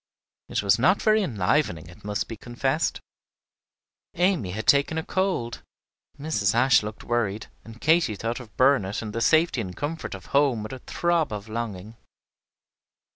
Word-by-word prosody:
It - - -1
was 100 +2 +3
not 185 - +4
very 215 0 +3
enlivening, 105 - 0
it 90 - -15
must 105 0 -2
be 115 - -6
confessed. 130 +7 -1 1.2
Amy 175 - +1
had 110 +4 -4
taken 140 +3 +3
a 160 - -1
cold, 185 -12 -1 0.6
Mrs. 115 -9 0
Ashe 125 -2 +5
looked 105 0 -7
worried, 110 -3 -1 0.2
and 115 +1 -12
Katy 160 -7 +3
thought 115 +5 -3
of 115 -4 -13
Burnet 130 -7 +2
and 105 -1 -6
the 115 - -2
safety 160 -1 +3
and 90 -4 -7
comfort 150 -5 -4
of 95 - -11
home 140 -6 +3
with 110 - -7
a 130 - -7
throb 170 0 0
of 105 0 -6
longing. 110 -1 -5
120 Hz, 160 wpm, -25 LUFS, 105-150 Hz, 1.2 s, Ashe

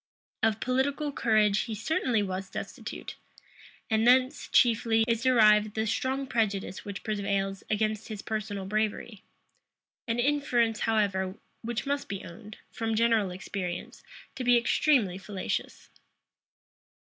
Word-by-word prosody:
Of 220 -1 +2
political 280 +4 0
courage 215 -5 +2
he 225 - -4
certainly 225 -1 0
was 190 -1 -4
destitute; - - -7 0.7
and 220 0 +2
thence, 255 +3 +3
chiefly, 225 -2 +3
is 230 -1 +1
derived 215 -4 +4
the 220 0 0
strong 260 +5 -1
prejudice 210 -6 -1
which 200 -1 -7
prevails 200 -2 -2
against 215 0 -1
his 215 -3 -7
personal 210 -3 -4
bravery; 215 +1 -2 0.9
an 230 0 0
inference, 240 -4 +1
however, 195 -4 +1 0.3
which 235 0 -3
must 280 0 -2
be 195 -1 -5
owned, 210 +4 -11
from 225 -1 -2
general 225 -3 +3
experience, 180 -1 -5 0.3
to 260 - -5
be 245 -1 +5
extremely 235 -5 +2
fallacious. 195 -1 -5
220 Hz, 120 wpm, -28 LUFS, 200-240 Hz, 0.9 s, be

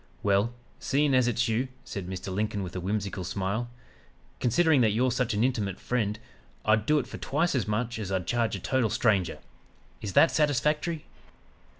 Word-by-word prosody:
"'Well, 100 +3 +2 0.3
seein' 140 +1 +1
as 130 -1 +4
it's 120 0 +1
you,' 115 +4 0 0.2
said 95 -3 -6
Mr. 95 0 -5
Lincoln 105 0 -1
with 90 -1 -7
a - - -2
whimsical 100 0 -2
smile, 100 +6 -2 0.7
'considering 150 +3 +3
that 110 -3 +3
you're 125 +3 +2
such 125 -3 0
an 105 - +2
intimate 105 -7 -1
friend, 110 -4 -1 0.5
I'd 110 +1 +3
do 150 - +4
it - - 0
for - - -9
twice 160 +6 0
as 130 -5 0
much 115 +2 -1
as 100 -3 -4
I'd 95 -2 -1
charge 115 +1 0
a - - -5
total 125 +3 +1
stranger! 105 - +1 0.6
Is 100 -3 -4
that 165 - +6
satisfactory?' 150 +2 +1
115 Hz, 180 wpm, -28 LUFS, 100-130 Hz, 0.7 s, that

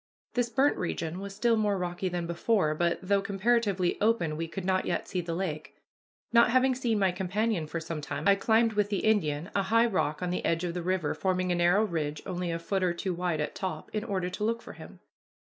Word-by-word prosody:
This 245 -1 0
burnt 270 +5 +2
region 170 -1 -3
was 200 0 -7
still 230 +2 +3
more 210 -2 +1
rocky 180 +1 -2
than 175 -1 -3
before, 170 -1 +1
but, 170 +2 +1
though 200 +1 +2
comparatively 200 -2 +1
open, 205 -8 +2
we 165 +2 -3
could 180 +3 -6
not 185 0 +1
yet - - -1
see 185 - -2
the 170 -1 -4
lake. 165 -4 -4 0.6
Not 235 +1 +6
having 255 +2 +4
seen 245 -3 0
my 190 -2 +3
companion 190 -1 -1
for 165 - -3
some 165 -1 -5
time, 150 - -3
I 200 - +8
climbed 220 +3 +2
with 205 -1 +1
the 200 - -1
Indian 175 -6 +1
a 200 - +2
high 225 +4 +3
rock 185 -7 -1
on 180 - -1
the 180 - -2
edge 165 +1 0
of 175 -1 -2
the 180 - -3
river 180 -3 0
forming 185 -1 0
a - - +3
narrow 175 +4 +4
ridge 155 -7 -2
only 180 -2 -3
a 165 - -1
foot 190 +3 -2
or 180 -2 +1
two 185 +1 -2
wide 175 -3 -1
at 150 - -3
top, 185 -5 -5
in 215 -1 -1
order 185 -4 -2
to 210 - -4
look 230 +1 0
for - - -9
him. - - -13
185 Hz, 230 wpm, -29 LUFS, 170-210 Hz, 0.6 s, I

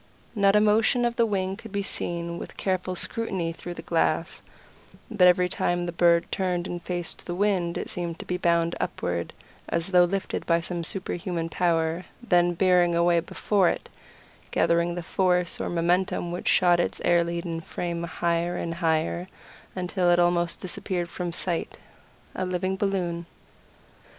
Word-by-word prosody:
Not 200 -2 +4
a - - +7
motion 220 +3 +3
of 235 0 0
the 235 -1 +3
wing 190 -2 -1
could 225 0 -11
be 200 0 -1
seen 170 -2 -3
with - - -9
careful 185 -1 -1
scrutiny 185 -5 -2
through 175 +1 -7
the - - -8
glass, - - 0 0.7
but 190 -5 +5
every 180 0 +4
time 175 -1 0
the 175 - -3
bird 170 0 +4
turned 180 -2 -1
and 175 -1 -5
faced 175 -1 -4
the 175 - -3
wind 185 -3 +1
it - - -4
seemed 170 -2 -4
to 180 0 -4
bound 170 0 +2
upward 85 -1 -2 0.4
as 170 +2 -1
though 180 -2 +6
lifted 195 +2 -2
by 170 0 +4
some 170 0 -4
super 185 +3 -3
human 170 -2 -3
power, 165 0 0
then 175 -7 +2
bearing 180 -1 +4
away 170 0 +4
before 185 +2 +1
it, - - -4 0.6
gathering 170 +1 +2
the 175 - -4
force 180 0 +1
or - - -2
momentum 175 +1 0
which 175 - -5
shot 175 -1 +4
its - - -1
air 175 -1 +4
laden 170 -1 -3
frame 170 +1 -4
higher 170 +1 -1
and 165 - -3
higher 165 +1 0 0.5
until 180 0 0
it 175 - +5
almost 175 -1 +2
disappeared 175 -1 -3
from 175 -1 -4
sight 175 0 -2 0.6
a 185 - -3
living 185 +1 -1
balloon." 180 -4 -1
175 Hz, 165 wpm, -26 LUFS, 170-185 Hz, 0.7 s, a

